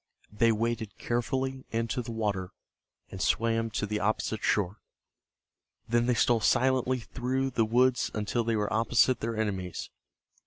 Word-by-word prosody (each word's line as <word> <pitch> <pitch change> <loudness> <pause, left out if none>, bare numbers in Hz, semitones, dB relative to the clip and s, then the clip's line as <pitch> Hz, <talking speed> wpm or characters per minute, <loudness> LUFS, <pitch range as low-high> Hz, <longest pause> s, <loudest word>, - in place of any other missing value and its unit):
They 115 +2 +3
waded 115 -1 -2
carefully 130 +2 -2
into 115 +2 -1
the 120 0 -7
water 105 -5 -2 0.6
and 95 - -6
swam 115 +1 +1
to 105 - -2
the 105 0 -2
opposite 110 +1 -1
shore. 100 0 +1 1.1
Then 120 +1 +2
they 125 - +3
stole 120 0 +3
silently 130 +1 +2
through 130 +3 -2
the 115 -2 +2
woods 125 +2 +2
until 110 +3 -1
they 115 0 0
were 105 -1 -1
opposite 115 +3 +3
their 115 0 -3
enemies. 95 -5 -3
115 Hz, 145 wpm, -29 LUFS, 105-125 Hz, 1.1 s, They